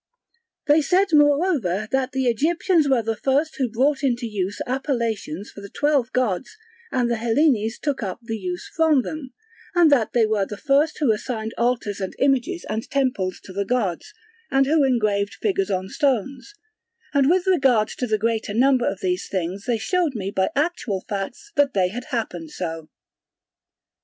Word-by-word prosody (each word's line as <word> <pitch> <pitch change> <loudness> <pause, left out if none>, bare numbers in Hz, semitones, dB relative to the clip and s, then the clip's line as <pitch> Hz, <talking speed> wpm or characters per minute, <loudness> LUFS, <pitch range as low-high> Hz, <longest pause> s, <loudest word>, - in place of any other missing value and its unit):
They 300 +2 +5
said 375 +6 +2
moreover 290 - +3
that 265 -1 0
the 265 0 -1
Egyptians 315 - +2
were 255 -4 +3
the 225 +1 -1
first 280 +7 0
who 260 -4 0
brought 265 +5 +1
into 250 -3 0
use 205 -3 -3
appellations 235 - -2
for 205 - -11
the 200 - -9
twelve 285 -2 +1
gods 250 - -1 0.3
and 245 -2 +1
the 235 -1 0
Hellenes 230 -1 +1
took 285 -4 -2
up 195 -2 -4
the 225 -1 -4
use 180 -2 -5
from 315 -5 +3
them; 300 -5 -6 0.4
and 340 -3 +5
that 235 -6 +2
they 235 -2 +4
were 210 -3 0
the 210 - -7
first 290 +5 +2
who 280 -7 +2
assigned 220 0 -3
altars 235 -4 -1
and 190 - -4
images 275 +6 +1
and 220 +1 -4
temples 250 -10 -1
to 190 - -11
the 200 +1 -1
gods, 200 -7 -2 0.4
and 270 0 +3
who 300 +1 +3
engraved 215 -6 +1
figures 390 -2 -1
on 185 0 -1
stones; 270 - -1 0.6
and 280 -1 +4
with 360 +2 +2
regard 270 - +3
to 250 - -4
the 215 -1 +1
greater 220 -1 -1
number 255 +1 +3
of 190 - -6
these 180 0 -1
things 190 +1 -3
they 240 -2 +1
showed 325 - 0
me 195 -2 -3
by 190 -1 +1
actual 280 - -1
facts 205 - -5
that 285 -4 +2
they 185 -2 +2
had 240 +5 -6
happened 220 - -4
so. 165 -2 -5
245 Hz, 175 wpm, -23 LUFS, 205-285 Hz, 0.6 s, They